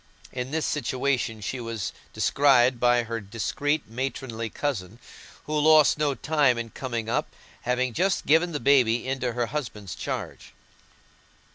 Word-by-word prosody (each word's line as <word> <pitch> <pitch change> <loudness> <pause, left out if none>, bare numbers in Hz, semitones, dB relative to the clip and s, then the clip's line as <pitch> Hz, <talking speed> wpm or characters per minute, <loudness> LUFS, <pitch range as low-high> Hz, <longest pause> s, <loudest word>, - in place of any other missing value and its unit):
In 125 0 -4
this 160 +2 -1
situation 125 -4 -1
she 125 +6 -4
was 115 -5 -4 0.2
descried 130 -3 +3
by 120 0 +3
her 115 0 -4
discreet 140 +8 -2
matronly 115 -1 -4
cousin, 115 -9 -3 0.5
who 155 - -4
lost 155 0 +5
no 145 -2 +1
time 145 -6 +2
in 115 -1 -5
coming 120 -4 -4
up, - - -2 0.3
having 125 0 0
just 190 - 0
given 165 +4 +4
the 150 - -3
baby 125 -2 +3
into 130 -2 -1
her 120 0 0
husband's 115 - -5
charge. - - -6
125 Hz, 140 wpm, -26 LUFS, 115-145 Hz, 0.5 s, lost